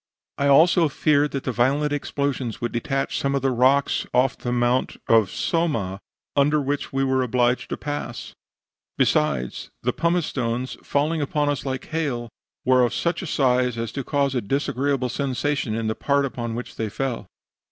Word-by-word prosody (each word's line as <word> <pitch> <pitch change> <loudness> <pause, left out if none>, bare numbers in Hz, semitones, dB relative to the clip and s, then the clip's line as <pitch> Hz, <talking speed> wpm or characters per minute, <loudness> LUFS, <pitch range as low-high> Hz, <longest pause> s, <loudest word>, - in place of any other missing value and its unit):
"I 140 - +2
also 160 +3 +5
feared 145 +1 +2
that 135 -2 -4
the 130 - -1
violent 140 +5 +1
explosions 140 -4 -2
would 120 - -2
detach 135 +3 -1
some 140 0 0
of 135 - -1
the 135 - +2
rocks 130 +3 +2
off 130 +1 +3
the 120 - -4
mountain 120 +1 +1
of 110 -4 +4
Somma, 115 - -1 0.4
under 145 +2 +3
which 145 0 -2
we 135 0 0
were 130 -1 +2
obliged 125 0 +1
to - - -3
pass; 145 -5 -5 0.6
besides, 65 -5 +1
the 125 +1 +1
pumice 170 0 +1
stones, 125 0 -2
falling 155 +3 0
upon 145 +1 0
us 145 -1 -2
like 130 -1 -3
hail, 135 -7 -2 0.4
were 130 0 +5
of 120 -1 +1
such 170 0 -1
a 185 - -5
size 125 -4 +2
as 115 0 -3
to 140 - -4
cause 140 0 0
a 125 - 0
disagreeable 135 +2 0
sensation 135 -2 -1
in 115 0 -2
the 110 - 0
part 140 +4 +1
upon 120 -3 -4
which 120 - -7
they 110 -1 -2
fell. 130 +2 -3
135 Hz, 175 wpm, -23 LUFS, 120-145 Hz, 0.6 s, also